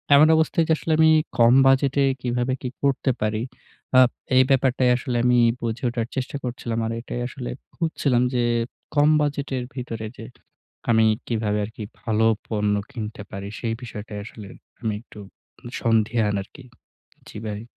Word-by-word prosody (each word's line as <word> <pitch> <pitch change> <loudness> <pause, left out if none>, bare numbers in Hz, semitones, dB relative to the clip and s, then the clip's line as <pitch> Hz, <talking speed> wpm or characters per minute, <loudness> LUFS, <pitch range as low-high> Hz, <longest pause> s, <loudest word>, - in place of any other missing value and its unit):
এমন 150 +2 +7
অবস্থায় 160 +1 +2
যে - - -2
এটা 160 - +4
আসলে 160 - -3
আমি 160 0 +7 0.3
কম 115 0 +6
বাজেটে 135 +1 +3 0.2
কিভাবে 125 +1 -1
কি 125 - -3
করতে 140 -1 +2
পারি। 110 0 0 0.6
আ - - +9 0.4
এই 130 - +7
ব্যাপারটাই 130 -1 +3
আসলে 125 -1 -2
আমি 125 0 +4 0.2
বুঝে 115 +1 -3
ওঠার 115 -1 -2
চেষ্টা 130 +2 -3
করছিলাম। 120 -2 -3
আর 115 - -2
এটাই 120 0 -5
আসলে 125 -1 -7 0.3
খুঁজছিলাম 140 -7 +1
যে 120 - +2 0.5
কম 145 +1 +5
বাজেটের 140 -3 -2
ভিতরে 115 -4 -5
যে 115 - -8 0.7
আমি 115 -1 +5 0.2
কিভাবে 110 -3 -1
আরকি 110 +1 -8 0.2
ভালো 110 0 +2 0.2
পণ্য 105 -2 0 0.2
কিনতে 110 -5 -6
পারি? 100 +1 -6
সেই 115 -2 -1
বিষয়টাই 105 -3 -7
আসলে 105 -3 -10 0.3
আমি 110 -2 -1
একটু 110 - -15 0.6
সন্ধিহান 110 -2 +2
আরকি, 130 +7 -14 0.6
জি - - -10
ভাই। 105 0 -4
120 Hz, 155 wpm, -23 LUFS, 110-130 Hz, 0.7 s, আ